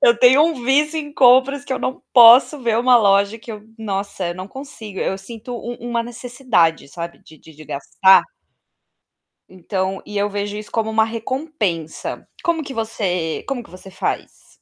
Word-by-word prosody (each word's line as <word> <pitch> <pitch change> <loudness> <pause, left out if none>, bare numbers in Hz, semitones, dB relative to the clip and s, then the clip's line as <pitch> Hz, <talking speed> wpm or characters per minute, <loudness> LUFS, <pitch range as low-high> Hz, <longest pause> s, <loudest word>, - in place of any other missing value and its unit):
Eu 235 -1 +5
tenho 260 +4 +6
um 310 -7 -1
vício 300 +4 +2
em 290 -1 -6
compras 265 +1 +4
que - - -15
eu 260 - -2
não 260 - -4
posso 245 +5 +8
ver 230 -1 +1
uma 250 0 +5
loja 200 0 +3
que 225 +1 -9
eu 210 - -9 0.2
nossa, 195 -3 -4
eu 175 - -4
não 185 +2 -8
consigo, 225 -7 -9
eu 190 - -2
sinto 230 +4 -9
um 240 +1 -6 0.2
uma 235 -1 0
necessidade, 235 - -1
sabe, 170 +4 -7
de 155 - -17
de 160 - -16
de 155 +1 -13
gastar. 190 +7 +4 1.3
Então 190 +1 -4
e 210 - -6
eu 205 +1 0
vejo 205 0 -4
isso 210 0 -9
como 220 -1 -1
uma 220 0 +2
recompensa. 225 - -4 0.2
Como 330 -2 0
que 275 - -8
você 185 -8 -2
como 260 -4 -3
que - - -18
você 185 +2 -12
faz? 190 - -5
225 Hz, 180 wpm, -20 LUFS, 190-255 Hz, 1.3 s, posso